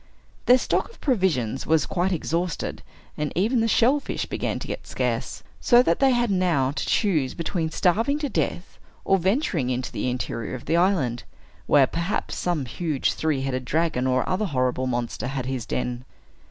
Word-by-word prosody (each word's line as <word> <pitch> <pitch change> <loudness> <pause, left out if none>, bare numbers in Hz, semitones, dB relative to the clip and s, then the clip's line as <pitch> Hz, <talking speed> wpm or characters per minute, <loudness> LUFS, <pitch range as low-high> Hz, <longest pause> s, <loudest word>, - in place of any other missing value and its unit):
Their 250 - +8
stock - - 0
of 465 - -18
provisions 170 - 0
was 160 -2 +3
quite 190 0 0
exhausted, 170 0 -2 0.3
and 150 -1 -2
even 220 +8 +2
the 225 - +2
shellfish 255 +6 +2
began - - -2
to - - -6
get - - -6
scarce, - - -2 0.2
so 245 -1 +5
that 165 -7 +1
they 270 - +5
had 240 -3 +2
now 170 -9 +2
to 145 - -3
choose 160 - +1
between 165 -1 -2
starving 225 - +1
to 300 -1 -2
death 185 -7 -3 0.3
or 195 - +3
venturing 190 - 0
into 125 -1 -2
the - - -2
interior 125 -1 -3
of 125 - -9
the 160 - +1
island, 170 -10 +1 0.4
where 140 -2 +6
perhaps 170 +8 -2
some 170 -6 -1
huge 150 +2 -1
three 155 -4 -1
headed 130 -1 -2
dragon, 155 -2 0
or 130 0 +1
other 185 +4 0
horrible 130 -5 0
monster, 120 0 -2
had 135 -1 -3
his 130 -3 -3
den. 125 0 -3
165 Hz, 175 wpm, -24 LUFS, 130-195 Hz, 0.4 s, Their